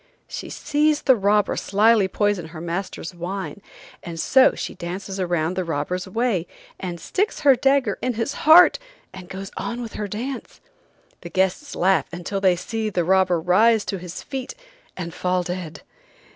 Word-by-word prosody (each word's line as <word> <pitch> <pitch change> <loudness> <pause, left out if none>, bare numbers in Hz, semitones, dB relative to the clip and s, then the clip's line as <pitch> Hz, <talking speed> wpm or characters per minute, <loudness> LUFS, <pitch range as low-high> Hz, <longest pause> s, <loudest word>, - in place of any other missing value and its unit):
She - - -7
sees 300 0 +1
the 260 - +5
robber 205 0 +2
slyly 210 0 +3
poison 205 -3 0
her 160 0 -10
master's 175 +1 -4
wine, 190 +3 -5 0.4
and 165 -1 -7
so 265 +9 +5
she - - -5
dances 190 +2 -6
around 175 -1 0
the 185 - -1
robber's 170 +3 -3
way, 205 -4 -1 0.3
and 175 -2 -5
sticks 405 - -2
her 280 -3 +6
dagger 270 +1 +2
in 250 -2 -1
his 230 +5 -2 0.2
heart 350 +8 +8 0.3
and 185 -1 -10
goes 195 0 -7
on 235 - -3
with 235 -2 -6
her 210 - -4
dance. 245 +7 -6 0.6
The 170 - -8
guests 190 - -1
laugh 190 +2 +2
until 180 +3 -4
they 185 -2 +4
see 220 +5 -3
the 180 -4 0
robber 185 -1 +3
rise 210 +6 +3
to 195 - -3
his 180 0 -8
feet 265 - -6 0.4
and 170 -2 -5
fall 180 0 0
dead. 175 -3 -6
190 Hz, 165 wpm, -23 LUFS, 180-230 Hz, 0.6 s, heart